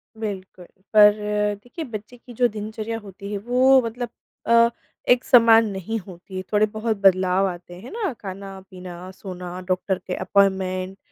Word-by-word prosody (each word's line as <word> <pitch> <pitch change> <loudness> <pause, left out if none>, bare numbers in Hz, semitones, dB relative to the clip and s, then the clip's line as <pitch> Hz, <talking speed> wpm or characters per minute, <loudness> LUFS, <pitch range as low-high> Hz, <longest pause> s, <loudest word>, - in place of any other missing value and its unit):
बिल्कुल, 195 -4 -6 0.3
पर 210 -1 +8 0.5
देखिए 310 +7 -7
बच्चे 220 0 -8
की 245 +1 -14
जो 245 +1 +3
दिनचर्या 220 +1 -5
होती 200 -1 -10
है, 205 - -2
वो 255 +5 +4
मतलब 235 +1 -4 0.4
अ, 235 0 +5 0.4
एक 245 0 +5
समान 230 -2 +6
नहीं 195 +3 -4
होती। 185 0 -9
थोड़े-बहुत 215 +1 +1
बदलाव 190 -1 +3
आते 175 -1 -7
हैं 230 - -11
ना? 435 -6 -2
खाना-पीना, 190 -2 -9
सोना, 180 -2 -8
डॉक्टर 185 +1 0
के 180 - -2
अपॉइंटमेंट, 190 -1 +1
205 Hz, 140 wpm, -23 LUFS, 185-230 Hz, 0.5 s, पर